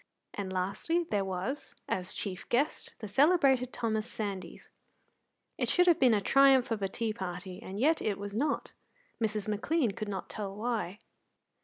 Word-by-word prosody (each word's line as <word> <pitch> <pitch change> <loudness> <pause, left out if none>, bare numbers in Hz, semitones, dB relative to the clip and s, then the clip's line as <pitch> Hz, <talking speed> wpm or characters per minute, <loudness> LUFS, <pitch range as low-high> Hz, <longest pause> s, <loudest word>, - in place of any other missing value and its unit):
And, 195 -2 -4
lastly, 200 - 0
there 205 -2 +2
was, 190 +9 -4
as 185 0 -2
chief 185 -3 -5
guest, 280 +6 0
the 215 - -6
celebrated 265 - +4
Thomas 220 -2 -1
Sandys. 200 -3 -5 0.9
It - - +1
should 360 - +4
have 345 -2 +5
been 250 -4 +5
a - - +3
triumph 270 +2 +5
of 220 -2 -1
a 195 - +1
tea 220 +3 -2
party, 185 -1 -6
and 195 -2 -6
yet 310 +6 +3
it 205 -2 0
was 200 0 -6
not. 285 +5 0 0.5
Mrs. 215 -2 -1
McLean 230 +5 +1
could 210 +1 -5
not 195 -2 -4
tell 200 -2 -5
why. 215 -4 -2
215 Hz, 165 wpm, -31 LUFS, 195-265 Hz, 0.9 s, have